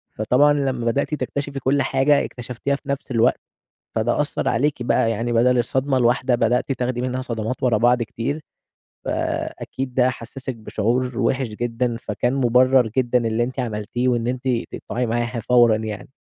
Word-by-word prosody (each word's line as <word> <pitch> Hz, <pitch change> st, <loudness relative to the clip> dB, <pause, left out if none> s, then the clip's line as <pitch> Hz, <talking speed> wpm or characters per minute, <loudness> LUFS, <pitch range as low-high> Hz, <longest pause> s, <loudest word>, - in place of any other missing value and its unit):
فطبعًا 130 Hz, +7 st, +3 dB
لمّا 135 Hz, -4 st, -1 dB
بدأتِ 140 Hz, +6 st, 0 dB
تكتشفي 140 Hz, -1 st, -4 dB
كل 135 Hz, +1 st, +1 dB
حاجة، 135 Hz, +2 st, +2 dB
اكتشفتيها 125 Hz, +3 st, -3 dB
في 140 Hz, 0 st, -11 dB
نفس 140 Hz, 0 st, -3 dB
الوقت، 115 Hz, -2 st, +3 dB, 0.6 s
فده -, -, +1 dB
أثّر -, -, -1 dB
عليكِ 140 Hz, +1 st, 0 dB
بقى، 115 Hz, -1 st, +2 dB
يعني 115 Hz, +2 st, -2 dB
بَدَل 125 Hz, +2 st, +4 dB
الصدمة 130 Hz, +3 st, +1 dB
الواحدة 125 Hz, +1 st, +2 dB
بدأتِ 120 Hz, +3 st, +1 dB
تاخدي 125 Hz, -1 st, -2 dB
منها 130 Hz, 0 st, -2 dB
صدمات 115 Hz, 0 st, -4 dB
ورا 120 Hz, -4 st, +3 dB
بعض 120 Hz, +2 st, +3 dB
كتير، 120 Hz, +6 st, -4 dB, 0.6 s
فأكيد 130 Hz, -1 st, -3 dB
ده 125 Hz, 0 st, +3 dB
حسّسِك 130 Hz, +1 st, -6 dB
بشعور 115 Hz, +3 st, -1 dB
وِحِش 130 Hz, -1 st, +1 dB
جدًا، 120 Hz, +2 st, -2 dB
فكان 120 Hz, +1 st, -2 dB
مُبرّر 130 Hz, -1 st, +4 dB
جدًا 125 Hz, -2 st, +2 dB
اللي 110 Hz, +1 st, +1 dB
أنتِ 130 Hz, +2 st, -4 dB
عملتيه 115 Hz, +1 st, -2 dB
وإن 120 Hz, -2 st, +1 dB
أنتِ 125 Hz, +1 st, -3 dB, 0.2 s
تقطعي 125 Hz, +1 st, -3 dB
معاها 120 Hz, +1 st, -1 dB
فورًا 120 Hz, -1 st, +4 dB
يعني. 110 Hz, +1 st, -6 dB
125 Hz, 160 wpm, -22 LUFS, 115-130 Hz, 0.6 s, بَدَل